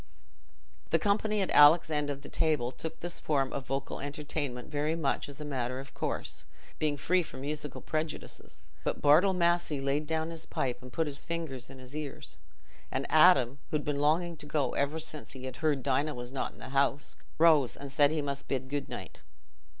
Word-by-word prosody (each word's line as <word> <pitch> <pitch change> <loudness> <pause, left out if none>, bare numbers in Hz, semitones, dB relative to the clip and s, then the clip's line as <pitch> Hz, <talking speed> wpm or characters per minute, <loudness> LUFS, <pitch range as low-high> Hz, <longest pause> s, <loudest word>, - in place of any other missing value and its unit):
The - - +4
company 210 0 +1
at 190 - 0
Alick's 155 +2 +7
end 150 -1 0
of 140 -1 -4
the - - -8
table 150 -6 +1
took 160 +5 -6
this 175 0 -4
form 135 -3 0
of 135 -1 -4
vocal 135 +1 -3
entertainment 145 -3 -3
very 150 +2 0
much 145 -3 -1
as 140 - -10
a 150 - -5
matter 130 -3 -2
of 135 +1 -10
course, - - -3 0.3
being 150 -2 +1
free 180 +6 +2
from 155 - -8
musical 150 0 -4
prejudices; 155 0 -5 0.2
but - - -1
Bartle 165 +7 +6
Massey 170 -4 +2
laid 140 +2 0
down 160 +1 -1
his 165 -1 -8
pipe 125 -2 -2
and 125 0 -11
put 160 +5 0
his 140 -2 -5
fingers 155 -7 -4
in 135 - -11
his 130 +2 -10
ears; 150 -2 -6 0.5
and 135 +1 -1
Adam, 140 -6 +6
who 150 - +1
had 145 - -6
been 145 -1 -1
longing 165 +3 +2
to 150 - -8
go 145 -5 0
ever 140 +3 0
since 155 -2 -5
he 130 -1 -9
had 130 -1 -6
heard 150 -4 +1
Dinah 145 +3 +1
was 120 0 -6
not 135 - -2
in - - -19
the - - -9
house, 140 +1 +1 0.2
rose 155 -6 +5
and 140 -1 -7
said 145 +1 +5
he 155 -1 -1
must 140 0 -4
bid 130 -1 -2
good 145 0 -3
night. - - -7
145 Hz, 205 wpm, -30 LUFS, 135-160 Hz, 0.5 s, Alick's